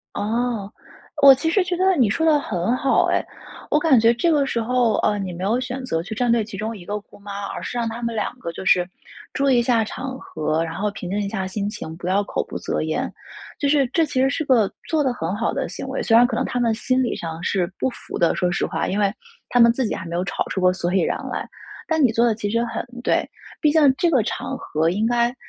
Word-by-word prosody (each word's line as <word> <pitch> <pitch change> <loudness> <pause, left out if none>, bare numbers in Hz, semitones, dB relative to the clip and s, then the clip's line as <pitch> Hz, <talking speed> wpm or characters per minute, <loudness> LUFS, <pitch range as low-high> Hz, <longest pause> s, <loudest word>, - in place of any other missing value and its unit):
哦， 225 -1 -1 0.5
我 275 -1 +10
其 320 +5 -1
实 395 +5 +3
觉 360 0 -1
得 375 +2 +3
你 245 -6 +4
说 320 +10 0
得 310 -2 +5
很 200 -2 -1
好 270 - +3
哎。 - - +1 0.5
我 - - +4
感 300 -6 +5
觉 230 +1 +5
这 330 +8 +1
个 290 -2 +3
时 235 -3 -1
候， 240 -1 +2
呃， 210 -1 +1
你 190 -2 -4
没 175 +2 -6
有 220 +6 +1
选 255 +1 -4
择 165 -10 -1
去 195 +6 -6
站 240 +1 +1
队 235 -2 +3
其 210 - -9
中 220 +3 -4
一 175 - -12
个 205 +2 -3
姑 - - -19
妈， 200 0 -6
而 - - -6
是 245 - -5
让 230 -1 0
她 230 +2 -6
们 230 -1 -2
两 220 +3 -2
个 170 - -5
就 - - -7
是 180 -1 +3 0.5
注 275 0 +1
意 255 - +4
一 - - +3
下 235 -2 +2
场 260 +4 -6
合， 155 +1 -2
然 165 -1 -5
后 205 +4 -1
平 190 -3 -7
静 200 +3 -1
一 205 - -1
下 195 -2 -3
心 200 +1 -3
情， 160 -6 -7
不 175 - -6
要 195 +2 +2
口 - - -3
不 - - -5
择 - - -2
言， - - -2 0.5
就 285 - +1
是 280 -1 +3
这 325 +6 +1
其 260 -3 -1
实 265 - +3
是 310 +3 -2
个 230 -8 +3 0.2
做 315 -2 +1
得 265 - +1
很 175 -4 -3
好 225 +2 0
的 275 -1 -2
行 - - -7
为。 270 - -2
虽 225 - +3
然 240 +1 +7
可 245 - -1
能 - - 0
她 250 - -2
们 230 -2 +2
心 255 +3 +1
理 245 - -1
上 165 0 -6
是 180 -2 0
不 - - +1
服 - - -8
的， 170 - +3
说 180 - +1
实 - - 0
话， - - -2
因 195 - -1
为 200 -1 +2 0.4
她 245 - +2
们 235 0 +7
自 255 +1 -1
己 - - -2
还 170 - -6
没 170 0 -5
有 175 - 0
吵 185 - -2
出 190 - -2
个 180 0 +5
所 180 -1 -2
以 190 - +3
然 - - 0
来。 - - -3 0.4
但 320 -2 +2
你 250 - +5
做 235 +1 +3
得 235 - +3
其 205 -1 -3
实 230 +2 +1
很 230 - -4 0.2
对， - - +1 0.3
毕 300 - +4
竟 295 -4 +5
这 345 - +2
个 265 -6 +4
场 255 - -4
合 160 -7 0
应 210 +5 0
该 240 +1 +1
230 Hz, 295 characters per minute, -22 LUFS, 195-260 Hz, 0.5 s, 我